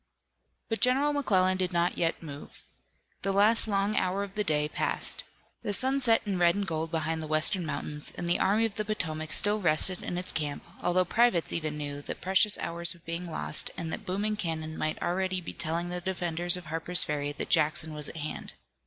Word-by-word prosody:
But 225 Hz, -, -3 dB
General 270 Hz, +4 st, +3 dB
McClellan 185 Hz, -10 st, +2 dB
did 185 Hz, -1 st, -1 dB
not 175 Hz, 0 st, +1 dB
yet 165 Hz, 0 st, -1 dB
move. 145 Hz, -2 st, -10 dB, 0.6 s
The 195 Hz, -, 0 dB
last 210 Hz, +4 st, +5 dB
long 200 Hz, 0 st, 0 dB
hour 190 Hz, +2 st, 0 dB
of 200 Hz, -1 st, -8 dB
the 210 Hz, 0 st, 0 dB
day 150 Hz, -5 st, +1 dB
passed. -, -, -1 dB, 0.4 s
The 205 Hz, -, -3 dB
sun 265 Hz, +6 st, +1 dB
set 230 Hz, -3 st, +3 dB
in 195 Hz, -3 st, -1 dB
red 175 Hz, -1 st, +4 dB
and 200 Hz, 0 st, -1 dB
gold 160 Hz, -2 st, -3 dB
behind 160 Hz, 0 st, -2 dB
the 155 Hz, -, -4 dB
western 160 Hz, +3 st, +3 dB
mountains, 150 Hz, -1 st, -3 dB
and 175 Hz, -, -4 dB
the 175 Hz, -, +2 dB
Army 210 Hz, +4 st, +3 dB
of 215 Hz, -3 st, -4 dB
the 215 Hz, -, 0 dB
Potomac 155 Hz, -7 st, -2 dB
still 210 Hz, +1 st, +4 dB
rested 180 Hz, 0 st, +2 dB
in 175 Hz, -, -4 dB
its 180 Hz, -, +1 dB
camp, 150 Hz, -2 st, -3 dB, 0.2 s
although 180 Hz, +1 st, +2 dB
privates 225 Hz, -4 st, +2 dB
even 155 Hz, -2 st, -3 dB
knew 145 Hz, -1 st, -5 dB
that -, -, -7 dB
precious 190 Hz, +3 st, +4 dB
hours 170 Hz, +1 st, 0 dB
were 170 Hz, -, -20 dB
being 170 Hz, +1 st, -4 dB
lost, 160 Hz, -, 0 dB
and 165 Hz, -2 st, -4 dB
that -, -, -7 dB
booming 205 Hz, +3 st, -1 dB
cannon 160 Hz, -4 st, -3 dB
might 155 Hz, 0 st, -2 dB
already 185 Hz, +1 st, 0 dB
be 175 Hz, -, -7 dB
telling 170 Hz, +2 st, -2 dB
the 180 Hz, 0 st, -4 dB
defenders 175 Hz, -1 st, +1 dB
of 180 Hz, -, -9 dB
Harper's 165 Hz, +3 st, +2 dB
Ferry 145 Hz, -1 st, -2 dB
that 140 Hz, -, -5 dB
Jackson 155 Hz, 0 st, +2 dB
was 150 Hz, -1 st, -2 dB
at -, -, -9 dB
hand. 155 Hz, 0 st, -6 dB
175 Hz, 205 wpm, -29 LUFS, 160-195 Hz, 0.6 s, last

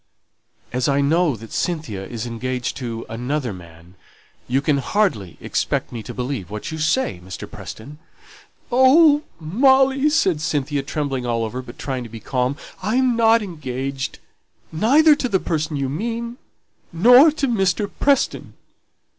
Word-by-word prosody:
"As 125 Hz, +3 st, 0 dB
I 140 Hz, 0 st, +2 dB
know 155 Hz, +1 st, +2 dB
that 115 Hz, 0 st, -12 dB
Cynthia 155 Hz, -, -2 dB
is 110 Hz, +3 st, -6 dB
engaged 125 Hz, +1 st, -3 dB
to 115 Hz, -3 st, -5 dB
another 125 Hz, +1 st, -3 dB
man, 85 Hz, -1 st, -14 dB, 0.5 s
you 130 Hz, +2 st, +1 dB
can 145 Hz, 0 st, +1 dB
hardly 125 Hz, -, -1 dB
expect -, -, -2 dB
me 115 Hz, -, -5 dB
to 105 Hz, -, -8 dB
believe 125 Hz, -7 st, -4 dB
what 105 Hz, +6 st, -6 dB
you 160 Hz, -, -5 dB
say, 155 Hz, -, 0 dB
Mr. 95 Hz, +1 st, -8 dB
Preston." 145 Hz, +7 st, -10 dB, 0.7 s
"Oh, 285 Hz, +4 st, +6 dB, 0.2 s
Molly," 265 Hz, -, +3 dB
said 190 Hz, -, +1 dB
Cynthia, 145 Hz, -3 st, -1 dB
trembling 135 Hz, -3 st, -3 dB
all 115 Hz, -1 st, 0 dB
over, 125 Hz, +4 st, -5 dB
but 125 Hz, -1 st, -12 dB
trying 130 Hz, -2 st, -4 dB
to 120 Hz, -, -8 dB
be 115 Hz, +1 st, -9 dB
calm, 125 Hz, +4 st, -1 dB, 0.2 s
"I 210 Hz, +5 st, -1 dB
am 255 Hz, -2 st, +3 dB
not 230 Hz, -1 st, +4 dB
engaged 135 Hz, -6 st, -5 dB, 0.5 s
neither 290 Hz, -, +5 dB
to 260 Hz, -4 st, -2 dB
the 190 Hz, -3 st, +2 dB
person 155 Hz, -3 st, -2 dB
you 135 Hz, -1 st, -1 dB
mean, 230 Hz, -, -4 dB, 0.5 s
nor 245 Hz, -, +7 dB
to 285 Hz, -3 st, -1 dB
Mr. 200 Hz, -3 st, +1 dB
Preston." 280 Hz, -1 st, +1 dB
150 Hz, 150 wpm, -21 LUFS, -, 0.7 s, nor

